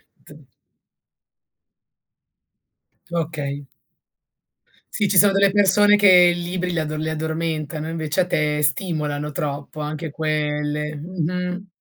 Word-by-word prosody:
D - - -18 2.6
Okay. 145 -4 -3 1.3
Sì, 205 -2 0
ci 190 - +2
sono 200 -1 +6
delle 195 0 +4
persone 205 +1 +4
che 205 -1 +4 0.3
i 175 - -5
libri 180 +1 -3
li 170 - -1
addo 155 0 -3
li 155 +1 -3
addormentano, 160 -1 -3
invece 165 +1 -1
a - - +1
te 150 -3 0
stimolano 150 -1 -1
troppo 145 +1 -5
anche 155 +1 -4
quelle. 150 0 -2
Mh-mh. 180 +4 -4
160 Hz, 110 wpm, -21 LUFS, 150-180 Hz, 2.6 s, sono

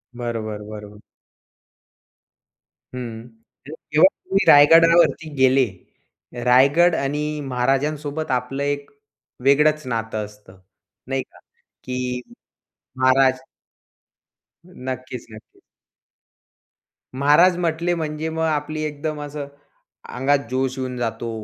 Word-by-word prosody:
बरोबर, 115 -3 -4
बरोबर. 105 -1 -10 2.0
हं, 115 -2 -7 0.4
तर 155 - -8 0.2
जेव्हा 155 +5 +7 0.2
तुम्ही 195 +1 +1
रायगडावरती 165 +1 +6
गेले. 130 0 +4 0.8
रायगड 140 +8 +4
आणि 145 +1 -2 0.2
महाराजांसोबत 140 +4 -1
आपलं 130 +2 -2
एक 145 0 -3 0.5
वेगळंच 150 +1 +3
नातं 115 -2 -3
असतं, 105 -2 -17 0.5
नाही 135 0 -1
का? - - -22 0.4
की 125 -1 -3 0.8
महाराज 130 0 +3 1.3
नक्कीच, 130 -6 -7
नक्कीच. 110 - -15 1.5
महाराज 150 +6 +4
म्हंटले 170 0 -1
म्हणजे 155 0 -3
मग 160 0 -3
आपली 155 0 -2
एकदम 150 0 -4
असं 145 -1 -6 0.7
अंगात 135 +2 +2
जोश 130 0 -1
येऊन 130 -1 -4
जातो, 115 0 -3
135 Hz, 90 wpm, -21 LUFS, 125-155 Hz, 2.0 s, जेव्हा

